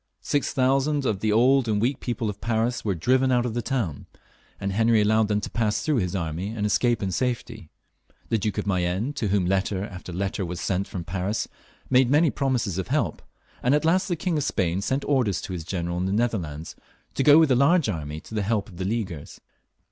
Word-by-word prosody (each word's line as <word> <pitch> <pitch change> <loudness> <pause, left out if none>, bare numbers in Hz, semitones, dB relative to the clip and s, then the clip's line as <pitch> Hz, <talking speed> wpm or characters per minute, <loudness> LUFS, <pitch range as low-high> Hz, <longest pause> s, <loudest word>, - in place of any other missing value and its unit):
Six 145 - 0
thousand 135 +2 +1
of 105 -6 0
the 110 +1 0
old 125 +3 +4
and 105 -2 +1
weak 125 +5 0
people 120 -2 -3
of 105 -1 -5
Paris 115 +2 0
were 100 -3 0
driven 130 +9 +2
out 120 -1 +2
of 120 - -2
the 120 - -1
town, 115 - -3 0.5
and 100 - -2
Henry 115 +2 +3
allowed 110 +1 +3
them 105 0 +1
to - - -5
pass 110 -2 0
through 150 -3 +1
his 90 -3 -1
army 85 +1 -3
and 110 -2 -3
escape 120 +1 +1
in 95 - -1
safety. 115 -4 -3 0.6
The 115 - +1
Duke 105 -1 -2
of - - -1
Mayenne, 95 +6 0
to 130 -6 -2
whom 100 -2 +1
letter 95 +1 0
after 90 -2 -9
letter 95 +2 -2
was 90 -1 -5
sent 95 +1 -1
fix)m 85 -3 -5
Paris, 95 +4 -2 0.4
made 130 -1 +4
many 150 +2 +4
promises 120 -9 -1
of 95 - -3
help, - - -1 0.4
and 125 +4 +3
at 150 +1 0
last 180 +4 +3
the 175 - 0
King 170 0 -1
of - - -1
Spain 95 -8 0
sent 130 +7 -1
orders 125 - +1
to 95 - -6
his 85 -3 -4
general 85 0 -3
in 90 - -1
the 95 - -1
Netherlands 90 -10 -2 0.4
to - - -1
go 145 +2 +7
with 160 -4 +5
a - - +5
large 150 +4 +4
army 75 -6 -4
to - - -13
the 110 - 0
help 105 0 -1
of 90 - -13
the 95 - -3
Leaguers. 100 -8 -4
110 Hz, 225 wpm, -25 LUFS, 95-130 Hz, 0.6 s, go